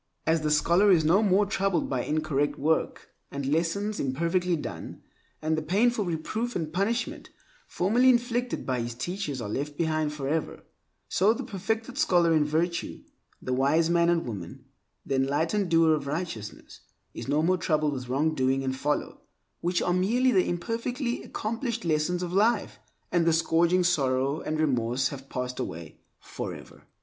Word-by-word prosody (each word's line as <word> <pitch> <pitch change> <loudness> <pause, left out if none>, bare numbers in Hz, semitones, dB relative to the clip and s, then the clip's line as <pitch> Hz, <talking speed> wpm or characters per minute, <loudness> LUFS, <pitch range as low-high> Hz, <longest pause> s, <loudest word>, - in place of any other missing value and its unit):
As 160 0 +2
the 155 - -1
ripe 150 - +3
scholar 175 +7 +4
is 165 -5 +5
no 180 +7 +4
more 205 -1 +3
troubled 195 -5 0
by 130 -3 -1
incorrect 150 -2 0
work 160 +3 -1 0.2
and 140 -1 -5
lessons 170 +8 0
imperfectly 170 +6 0
done, 150 - -7 0.4
and 160 +1 +1
the 155 - -1
painful 210 +7 +1
reproof 215 +8 -3
and 160 -2 -3
punishment 210 +7 -1 0.4
formerly 235 +8 +3
inflicted 245 0 0
by 130 -2 -1
his 120 0 -4
teachers 150 +1 -4
are 110 - -4
left 145 +7 -4
behind 155 -2 0
forever, 150 +2 -3 0.4
so 200 +4 +3
the - - -5
perfected 225 +6 -3
scholar 175 - +4
in 155 -2 +4
virtue, 165 +3 -2 0.4
the 130 - -2
wise 150 +6 +2
man 170 0 +3
and 170 -1 +1
woman, 100 -8 -7 0.4
the 140 - -2
enlightened 160 +9 +1
doer 165 -1 +5
of 145 -2 -2
righteousness, 140 - -5 0.3
is - - -7
no 145 +3 +1
more 185 +2 +3
troubled 155 -2 +1
with 125 -2 -6
wrongdoing 135 -1 +1
and 130 0 -1
folly 150 +2 -1 0.5
(which 175 +1 0
are 175 - +1
merely 235 +8 +2
the 185 -5 +3
imperfectly 235 - -2
accomplished 230 0 -4
lessons 165 +3 0
of 175 0 -4
life), 215 +5 +1 0.3
and 170 -2 +2
the - - +5
scourging 170 +2 +3
of - - 0
sorrow 140 -3 +1
and 155 0 -3
remorse 125 -3 +1
have 135 -1 -9
passed 125 0 -4
away 80 -1 -6 0.2
forever. - - -8
165 Hz, 165 wpm, -27 LUFS, 145-195 Hz, 0.5 s, is